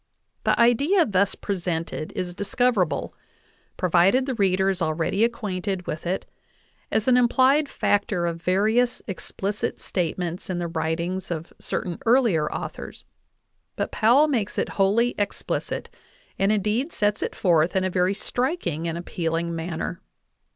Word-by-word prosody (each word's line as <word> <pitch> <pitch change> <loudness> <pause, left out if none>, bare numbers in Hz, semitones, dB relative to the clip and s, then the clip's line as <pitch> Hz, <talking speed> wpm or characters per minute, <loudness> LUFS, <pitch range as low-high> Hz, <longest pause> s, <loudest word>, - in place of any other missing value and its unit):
The - - +2
idea 280 - +4
thus 200 -2 +1
presented 170 -5 -3
is 180 -1 -3
discoverable, 205 -1 0 0.6
provided 185 +8 +3
the 265 - -2
reader 190 -3 +2
is 185 -1 -3
already 165 +6 +1
acquainted 195 -5 -2
with 155 +2 -4
it, 185 +2 -1 0.7
as 220 +1 0
an 250 -1 +5
implied 260 +4 +4
factor 200 -3 0
of 170 -1 -3
various 220 +7 +2
explicit 200 +1 -4
statements 175 0 -3
in 185 - -1
the 175 - -2
writings 170 +3 -2
of 165 -1 -5
certain 175 -2 -3
earlier 225 - +3
authors; - - -6 0.7
but - - -2
Powell 250 +8 +5
makes 230 -9 -1
it - - 0
wholly 215 +5 +2
explicit, 205 0 -2 0.5
and 195 +2 +3
indeed 215 - 0
sets 205 0 0
it - - -3
forth 170 -2 +2
in 190 - +2
a 185 - +1
very 185 +2 +1
striking 200 - -2
and 165 0 -2
appealing 170 -1 -2
manner. 165 +2 -4
190 Hz, 135 wpm, -24 LUFS, 170-230 Hz, 0.7 s, an